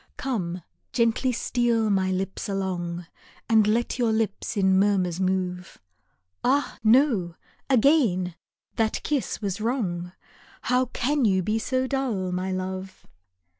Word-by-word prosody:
Come, 185 -10 -3 0.3
gently 235 +2 +2
steal 235 -2 +1
my 190 -1 +1
lips 190 +2 -3
along, 180 -3 -3 0.4
And 220 -2 +4
let 235 +3 0
your 235 -2 +2
lips 220 0 -1
in 190 -1 +4
murmurs 190 -4 +1
move, 185 -1 -2 0.7
Ah, 280 +3 +1
no! 220 - +3 0.3
again 230 - +3 0.4
that 220 -1 0
kiss 280 -6 -2
was 200 +1 -2
wrong, 185 -8 -2 0.5
How 250 +1 +2
can 265 +3 0
you 190 -4 +3
be 215 +4 0
so 255 +3 0
dull, 250 -9 -1
my 185 +1 -2
love 185 0 -5
205 Hz, 125 wpm, -25 LUFS, 185-240 Hz, 0.7 s, And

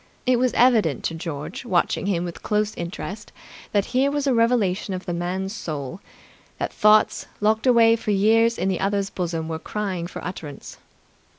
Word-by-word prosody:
It 250 -1 +3
was 255 0 +2
evident 220 - +3
to - - -1
George, 160 0 -6
watching 190 -3 0
him 175 -4 0
with 175 - -7
close 210 0 0
interest, 190 +4 -6 0.4
that 205 -1 +2
here 265 +2 +3
was 290 0 -1
a 270 - +2
revelation 225 -5 +1
of 185 0 -7
the 175 - -3
man's 185 +3 -3
soul; 155 - -5 0.6
that - - -3
thoughts, 215 0 +4
locked 220 +3 +1
away 230 -2 +6
for 225 - -5
years 225 +3 +3
in - - -1
the 190 -2 0
other's 200 0 0
bosom 165 -3 -3
were 160 -1 -4
crying 190 -3 -3
for - - -8
utterance. 155 -6 -7
200 Hz, 175 wpm, -23 LUFS, 175-225 Hz, 0.6 s, away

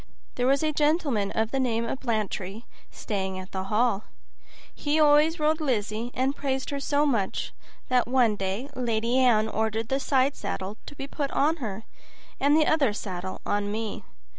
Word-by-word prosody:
There 250 0 0
was 275 +3 +3
a 310 0 +1
gentleman 295 - +1
of 220 +1 0
the 270 - 0
name 235 -3 0
of 255 - -3
Blantyre 215 -3 -2 0.3
staying 190 -3 -3
at 185 0 -8
the 190 0 -3
hall; 215 0 +1 0.7
he 295 +1 0
always 305 +2 +5
rode 310 +1 +2
Lizzie, 225 -4 -1
and 265 +2 +1
praised 265 -1 -2
her 280 - -2
so 285 +1 +1
much 225 -9 -1 0.3
that 250 -2 +2
one 245 -4 +3
day 195 +6 -3
Lady 235 0 +1
Anne 225 -4 +4
ordered 220 0 -1
the 270 - +1
side 275 0 +2
saddle 200 0 -4
to 290 - -9
be 275 - -5
put 280 0 -3
on 310 +5 +2
her, 220 -6 -5 0.6
and 290 +2 +4
the 310 - +4
other 285 -9 +3
saddle 185 -3 -5
on 205 0 0
me. 220 -1 -4
240 Hz, 175 wpm, -27 LUFS, 210-280 Hz, 0.7 s, always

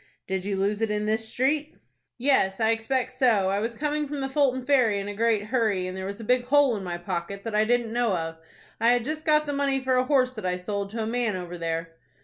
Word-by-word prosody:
"Did 190 -1 -3
you 200 -1 -1
lose 205 +2 0
it 225 - +1
in 210 0 -1
this 220 +1 0
street?" 295 +6 0 0.4
"Yes, 245 -7 +2
I 220 0 +3
expect 245 +3 -1
so. 230 -7 +2
I 200 - +1
was 230 +2 -3
coming 300 +3 -1
from 290 0 -4
the 270 0 -2
Fulton 265 -3 +1
Ferry 255 -7 +3
in 200 - -5
a 205 - -4
great 220 0 +1
hurry, 215 -5 0
and 185 0 -5
there 190 0 -4
was 200 +2 -6
a - - -7
big 250 +2 +2
hole 280 -2 +4
in 200 - -5
my 175 -2 -4
pocket, 180 +2 -4
that 225 - -5
I 215 +1 +3
didn't 235 -1 +1
know 235 -6 +1
of. 165 0 -5 0.4
I 235 +2 +5
had 240 -2 0
just 310 +2 -4
got 305 -1 +4
the 290 - -3
money 280 -1 +1
for 260 -1 +1
a 255 - +2
horse 255 -2 +2
that 215 - -7
I 180 -1 0
sold 200 +2 -4
to 225 +2 -3
a - - -2
man 230 -2 -1
over 180 -1 -6
there." 165 -1 -4
225 Hz, 260 wpm, -26 LUFS, 195-260 Hz, 0.4 s, I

